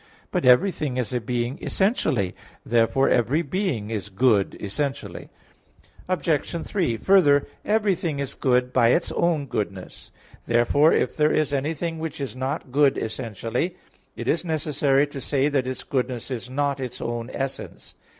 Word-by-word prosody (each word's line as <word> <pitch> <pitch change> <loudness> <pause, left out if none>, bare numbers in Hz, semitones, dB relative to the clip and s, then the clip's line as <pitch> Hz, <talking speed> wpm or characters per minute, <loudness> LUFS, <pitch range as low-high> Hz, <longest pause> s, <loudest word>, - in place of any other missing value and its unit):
But 130 - 0
everything 145 -1 +3
is 125 -2 -2
a 125 - 0
being 120 +4 -2
essentially; 130 - 0 0.3
therefore 120 +3 +3
every 130 +8 +2
being 145 - -2
is 105 -2 -3
good 105 -1 +2
essentially. 135 +8 -4 0.8
Obj. 170 -2 -1
3: 165 - 0
Further, 145 - +4 0.2
everything 195 -8 +1
is 140 -2 -3
good 125 -1 +1
by 120 -2 +4
its 165 +8 +2
own 165 -4 +1
goodness. 100 -7 -5 0.4
Therefore 120 +6 +4
if - - +1
there 150 0 +3
is 155 -2 +1
anything 160 +4 -2
which 160 -1 -5
is 135 -2 -4
not 130 0 -3
good 140 0 +3
essentially, 115 - -3 0.4
it - - -6
is 165 - +1
necessary 145 -4 +1
to 145 -2 -8
say 140 +1 +1
that 135 -3 0
its 130 -1 -4
goodness 125 -1 -3
is 125 -1 -5
not 140 +1 -1
its 130 -2 -5
own 120 0 -4
essence. 135 0 -6
135 Hz, 150 wpm, -24 LUFS, 120-155 Hz, 0.8 s, Further